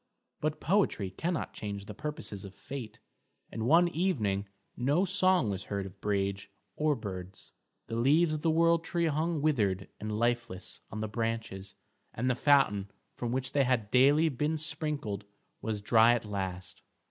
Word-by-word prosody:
But 155 Hz, 0 st, -1 dB
poetry 175 Hz, -, +1 dB
cannot 165 Hz, -, -2 dB
change 100 Hz, -1 st, -5 dB
the 105 Hz, -, -7 dB
purposes 150 Hz, -9 st, -5 dB
of 100 Hz, -1 st, -10 dB
fate, 120 Hz, -5 st, -7 dB, 0.5 s
and 110 Hz, 0 st, -3 dB
one 170 Hz, +5 st, +6 dB
evening 110 Hz, -, 0 dB, 0.3 s
no 145 Hz, +9 st, +2 dB
song 185 Hz, -, +3 dB
was 95 Hz, -1 st, -4 dB
heard 100 Hz, -1 st, -3 dB
of 95 Hz, +1 st, -11 dB
Brage 100 Hz, -1 st, -1 dB, 0.3 s
or 150 Hz, -1 st, +2 dB
birds, 95 Hz, -5 st, -7 dB, 0.3 s
the 115 Hz, -, -5 dB
leaves 155 Hz, +7 st, +4 dB
of 155 Hz, -, -3 dB
the 165 Hz, -, +2 dB
world 165 Hz, +1 st, +3 dB
tree 170 Hz, 0 st, 0 dB
hung 160 Hz, 0 st, 0 dB
withered 100 Hz, -11 st, +1 dB
and 105 Hz, 0 st, -3 dB
lifeless 115 Hz, -5 st, -1 dB
on 110 Hz, -, -5 dB
the 110 Hz, -, -1 dB
branches, 110 Hz, -3 st, -3 dB, 0.4 s
and 125 Hz, +3 st, +1 dB
the -, -, 0 dB
fountain 120 Hz, -8 st, +3 dB, 0.3 s
from 120 Hz, -1 st, -3 dB
which 130 Hz, +1 st, -1 dB
they 140 Hz, -, +3 dB
had 125 Hz, -5 st, 0 dB
daily 145 Hz, +5 st, +5 dB
been 150 Hz, +2 st, 0 dB
sprinkled 150 Hz, -, -3 dB, 0.4 s
was 105 Hz, -2 st, -3 dB
dry 115 Hz, +2 st, +6 dB
at 115 Hz, -, -3 dB
last. 95 Hz, -3 st, -4 dB
120 Hz, 160 wpm, -30 LUFS, 100-155 Hz, 0.5 s, one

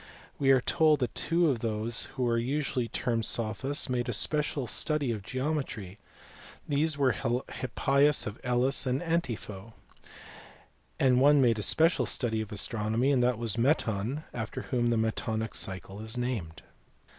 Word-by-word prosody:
We 135 Hz, -, +2 dB
are 135 Hz, -1 st, +6 dB
told 155 Hz, +3 st, +3 dB
that 125 Hz, -, -1 dB
two 170 Hz, 0 st, +1 dB
of 135 Hz, -6 st, +1 dB
those 115 Hz, +1 st, -1 dB
who 125 Hz, -3 st, 0 dB
are 115 Hz, 0 st, +1 dB
usually 130 Hz, -1 st, -1 dB
termed 115 Hz, -1 st, -1 dB
sophists 120 Hz, +6 st, -1 dB
made 125 Hz, -1 st, -1 dB
a -, -, 0 dB
special 150 Hz, +3 st, +1 dB
study 145 Hz, +2 st, 0 dB
of 110 Hz, -3 st, -4 dB
geometry 130 Hz, -6 st, -4 dB, 0.7 s
these 150 Hz, +1 st, +1 dB
were 135 Hz, -2 st, +3 dB
Hippias 135 Hz, +3 st, +1 dB
of 105 Hz, +1 st, -6 dB
Elis 125 Hz, +2 st, +2 dB
and 130 Hz, +1 st, +1 dB
Antipho 115 Hz, -, -3 dB, 1.3 s
and 130 Hz, -1 st, +4 dB
one 145 Hz, +1 st, +6 dB
made 115 Hz, -4 st, +3 dB
a -, -, -2 dB
special 165 Hz, -, +2 dB
study 110 Hz, -3 st, -1 dB
of 110 Hz, -, -7 dB
astronomy 110 Hz, +5 st, 0 dB
this 125 Hz, -1 st, +2 dB
was 115 Hz, -1 st, -3 dB
Meton, 120 Hz, 0 st, 0 dB
after 110 Hz, -2 st, -5 dB
whom 120 Hz, -1 st, 0 dB
the 120 Hz, -, +1 dB
metonic 110 Hz, 0 st, -2 dB
cycle 95 Hz, +2 st, -3 dB
is 110 Hz, +2 st, -5 dB
named. 110 Hz, -11 st, -4 dB
125 Hz, 150 wpm, -29 LUFS, 110-140 Hz, 1.3 s, are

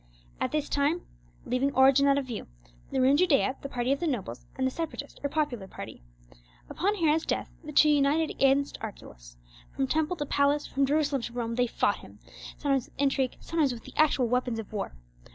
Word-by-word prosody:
At -, -, -1 dB
this 300 Hz, -1 st, -1 dB
time, 290 Hz, +5 st, +1 dB, 0.4 s
leaving 255 Hz, +2 st, +1 dB
origin 270 Hz, +1 st, +6 dB
out 275 Hz, 0 st, +4 dB
of 280 Hz, -, -1 dB
view, 240 Hz, -4 st, -6 dB, 0.4 s
there 265 Hz, -, 0 dB
were -, -, +4 dB
in 275 Hz, +2 st, +5 dB
Judea 295 Hz, -6 st, +3 dB
the 275 Hz, -, -6 dB
party 245 Hz, 0 st, -1 dB
of 275 Hz, -, +1 dB
the 340 Hz, -, -1 dB
nobles 125 Hz, -, -4 dB
and 260 Hz, -, -1 dB
the 260 Hz, -, +1 dB
Separatist 300 Hz, -2 st, -5 dB
or 285 Hz, -, -1 dB
popular 270 Hz, -10 st, -1 dB
party. -, -, -9 dB, 0.7 s
Upon 405 Hz, +4 st, 0 dB
Herod's 320 Hz, -3 st, +2 dB
death, -, -, -2 dB
the 305 Hz, -, -7 dB
two 300 Hz, +1 st, +6 dB
united 295 Hz, +2 st, +3 dB
against 275 Hz, +1 st, +2 dB
Archelaus; -, -, -10 dB, 0.4 s
from 270 Hz, -, +1 dB
temple 315 Hz, +5 st, 0 dB
to 295 Hz, -3 st, -3 dB
palace, 285 Hz, +1 st, +2 dB
from 275 Hz, 0 st, 0 dB
Jerusalem 285 Hz, -2 st, +1 dB
to 235 Hz, -, -6 dB
Rome, 235 Hz, -1 st, -2 dB
they 245 Hz, +1 st, +1 dB
fought -, -, +1 dB
him; -, -, -14 dB, 0.4 s
sometimes 275 Hz, -4 st, 0 dB
with -, -, -26 dB
intrigue, 275 Hz, -2 st, +1 dB
sometimes 315 Hz, -5 st, +1 dB
with 225 Hz, -, -11 dB
the -, -, -12 dB
actual 285 Hz, -5 st, +3 dB
weapons 250 Hz, -1 st, 0 dB
of 220 Hz, -1 st, -7 dB
war. 200 Hz, -, -4 dB
275 Hz, 205 wpm, -28 LUFS, 250-295 Hz, 0.7 s, origin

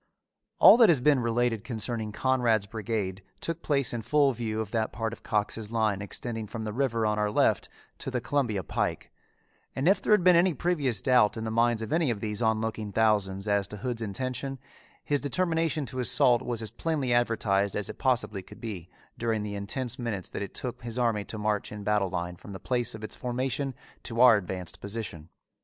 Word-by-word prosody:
All -, -, +9 dB
that 230 Hz, -3 st, +7 dB
has 160 Hz, -6 st, +5 dB
been 140 Hz, +1 st, +4 dB
related 120 Hz, -2 st, 0 dB
concerning 115 Hz, -2 st, -2 dB
Conrad's 120 Hz, -3 st, +2 dB
brigade 105 Hz, -3 st, -3 dB, 0.2 s
took 165 Hz, 0 st, -3 dB
place 140 Hz, -5 st, +1 dB
in 120 Hz, -, -2 dB
full 140 Hz, +4 st, +3 dB
view 110 Hz, -2 st, -3 dB
of 110 Hz, -2 st, -4 dB
that 110 Hz, -2 st, 0 dB
part 115 Hz, +1 st, -3 dB
of -, -, -11 dB
Cox's 105 Hz, +1 st, -2 dB
line 110 Hz, -4 st, +1 dB
extending 110 Hz, +2 st, -4 dB
from 110 Hz, +1 st, -6 dB
the 105 Hz, -1 st, -4 dB
river 115 Hz, -3 st, 0 dB
on 105 Hz, 0 st, +1 dB
our 105 Hz, 0 st, +1 dB
left 105 Hz, -, +2 dB, 0.3 s
to -, -, -4 dB
the 130 Hz, -1 st, -1 dB
Columbia 120 Hz, -6 st, -1 dB
Pike, -, -, -2 dB, 0.6 s
and 135 Hz, +4 st, 0 dB
if 195 Hz, 0 st, +4 dB
there -, -, -1 dB
had 210 Hz, -, +4 dB
been 180 Hz, -1 st, +7 dB
any 170 Hz, -1 st, +4 dB
previous 140 Hz, -, 0 dB
doubt 120 Hz, -4 st, +4 dB
in 110 Hz, -, -4 dB
the 110 Hz, -, -3 dB
minds 115 Hz, 0 st, +2 dB
of 110 Hz, -, -4 dB
any 160 Hz, -3 st, +2 dB
of 115 Hz, -4 st, -1 dB
these 105 Hz, +1 st, -3 dB
on 110 Hz, -1 st, +2 dB
looking 110 Hz, -2 st, -3 dB
thousands 105 Hz, -2 st, +1 dB
as 100 Hz, -2 st, +2 dB
to 105 Hz, -, -8 dB
Hood's 120 Hz, +2 st, -3 dB
intention, 130 Hz, +5 st, -3 dB, 0.5 s
his 145 Hz, -1 st, 0 dB
determination 160 Hz, 0 st, 0 dB
to 130 Hz, +1 st, -6 dB
assault 125 Hz, 0 st, +4 dB
was 120 Hz, -3 st, -3 dB
as 110 Hz, -, -5 dB
plainly 140 Hz, -1 st, -1 dB
advertised 105 Hz, -5 st, +1 dB
as 105 Hz, -, -2 dB
it -, -, -8 dB
possibly 115 Hz, -6 st, 0 dB
could -, -, -14 dB
be 95 Hz, -7 st, -6 dB, 0.3 s
during 115 Hz, -2 st, 0 dB
the 105 Hz, -1 st, -4 dB
intense 120 Hz, +5 st, -3 dB
minutes 110 Hz, -6 st, -3 dB
that -, -, -5 dB
it 100 Hz, -, -6 dB
took 125 Hz, -1 st, -4 dB
his 120 Hz, 0 st, -4 dB
army 115 Hz, -4 st, +1 dB
to 110 Hz, -, -6 dB
march 105 Hz, -1 st, -1 dB
in 105 Hz, -1 st, -7 dB
battle 105 Hz, -2 st, +1 dB
line 90 Hz, -1 st, -3 dB
from 100 Hz, -, -11 dB
the 95 Hz, -, -7 dB
place 120 Hz, -3 st, -1 dB
of 110 Hz, -, -10 dB
its 110 Hz, -, -4 dB
formation 130 Hz, +2 st, -2 dB, 0.3 s
to 115 Hz, -1 st, -2 dB
our 125 Hz, -2 st, +8 dB
advanced 90 Hz, -3 st, -6 dB
position. 100 Hz, -7 st, -6 dB
115 Hz, 210 wpm, -28 LUFS, 105-125 Hz, 0.6 s, All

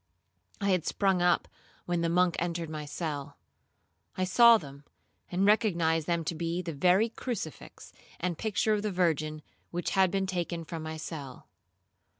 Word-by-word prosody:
I 200 Hz, -1 st, +1 dB
had 180 Hz, -3 st, +2 dB
sprung 190 Hz, 0 st, +1 dB
up 175 Hz, -1 st, +3 dB, 0.4 s
when 175 Hz, -1 st, 0 dB
the 170 Hz, -, +1 dB
monk 180 Hz, 0 st, +3 dB
entered 170 Hz, -2 st, -3 dB
my 155 Hz, -1 st, -5 dB
cell; 145 Hz, -2 st, -5 dB, 0.8 s
I 185 Hz, -, +1 dB
saw 230 Hz, +5 st, +7 dB
them, 140 Hz, -6 st, -11 dB, 0.5 s
and 185 Hz, +2 st, +1 dB
recognized 170 Hz, -7 st, +2 dB
them 170 Hz, -1 st, 0 dB
to 160 Hz, -, -2 dB
be 170 Hz, +2 st, -2 dB
the 165 Hz, -2 st, -4 dB
very 180 Hz, +9 st, +3 dB
crucifix 220 Hz, -, -6 dB, 0.3 s
and 180 Hz, 0 st, -1 dB
picture 215 Hz, +3 st, 0 dB
of 210 Hz, -, 0 dB
the 210 Hz, 0 st, -2 dB
Virgin 155 Hz, -4 st, 0 dB, 0.3 s
which 175 Hz, 0 st, -3 dB
had 190 Hz, -1 st, +4 dB
been 195 Hz, +1 st, 0 dB
taken 175 Hz, -2 st, -3 dB
from 165 Hz, 0 st, -6 dB
my 160 Hz, 0 st, -5 dB
cell. 145 Hz, -5 st, -8 dB
175 Hz, 160 wpm, -29 LUFS, 160-190 Hz, 0.8 s, saw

